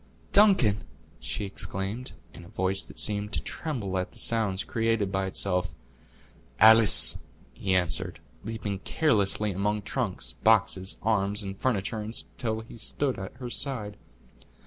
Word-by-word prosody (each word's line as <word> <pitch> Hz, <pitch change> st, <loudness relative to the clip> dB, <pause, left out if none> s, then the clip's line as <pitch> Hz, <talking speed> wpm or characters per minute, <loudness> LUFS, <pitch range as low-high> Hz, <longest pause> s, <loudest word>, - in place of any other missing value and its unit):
"Duncan!" 190 Hz, -, +5 dB, 0.4 s
she 105 Hz, -, -3 dB
exclaimed, 100 Hz, +5 st, -4 dB, 0.2 s
in 85 Hz, -, -12 dB
a -, -, -13 dB
voice 95 Hz, -1 st, +1 dB
that -, -, -7 dB
seemed 105 Hz, 0 st, +1 dB
to -, -, +1 dB
tremble 110 Hz, -, -4 dB
at 90 Hz, -, -5 dB
the -, -, -16 dB
sounds 105 Hz, -4 st, 0 dB
created 115 Hz, -3 st, 0 dB
by 95 Hz, 0 st, -1 dB
itself. 90 Hz, -2 st, -1 dB, 0.9 s
"Alice!" 110 Hz, -, +7 dB, 0.3 s
he 95 Hz, -1 st, -1 dB
answered, 90 Hz, -5 st, 0 dB, 0.2 s
leaping 110 Hz, -3 st, -4 dB
carelessly 105 Hz, -7 st, +2 dB
among 105 Hz, +2 st, -1 dB
trunks, -, -, -3 dB
boxes, 105 Hz, -3 st, +3 dB
arms, 105 Hz, -1 st, +1 dB
and 95 Hz, 0 st, -5 dB
furniture, 110 Hz, -3 st, -1 dB
until 110 Hz, +1 st, -4 dB
he 115 Hz, +1 st, -12 dB
stood 130 Hz, +3 st, -2 dB
at 95 Hz, -, -7 dB
her 120 Hz, -1 st, -7 dB
side. 115 Hz, -8 st, -2 dB
105 Hz, 135 wpm, -27 LUFS, 95-115 Hz, 0.9 s, Alice